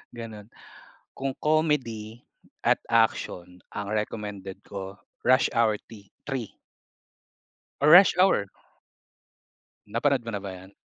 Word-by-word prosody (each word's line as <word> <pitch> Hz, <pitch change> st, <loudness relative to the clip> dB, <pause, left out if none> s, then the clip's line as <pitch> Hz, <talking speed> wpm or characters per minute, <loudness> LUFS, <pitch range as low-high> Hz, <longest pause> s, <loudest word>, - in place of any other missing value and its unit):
Ganon 110 Hz, -3 st, -8 dB, 0.7 s
kung 135 Hz, -1 st, -3 dB
comedy 125 Hz, -8 st, 0 dB, 0.4 s
at -, -, +4 dB
action 90 Hz, -5 st, 0 dB, 0.2 s
ang 105 Hz, -1 st, -4 dB
recommended 105 Hz, -3 st, -4 dB
ko 95 Hz, -1 st, -7 dB, 0.3 s
Rush 130 Hz, +1 st, +4 dB
Hour 115 Hz, -2 st, +3 dB, 0.2 s
ti 100 Hz, -3 st, -13 dB, 0.2 s
3 130 Hz, -5 st, -4 dB, 1.3 s
Or 150 Hz, -, +5 dB
Rush 180 Hz, +3 st, +9 dB
Hour. 180 Hz, -, +3 dB, 1.4 s
Napanood 120 Hz, +3 st, +1 dB
mo -, -, -3 dB
na 100 Hz, -, -2 dB
ba 100 Hz, -, -5 dB
yon? 95 Hz, +1 st, -12 dB
110 Hz, 110 wpm, -26 LUFS, 100-130 Hz, 1.4 s, Rush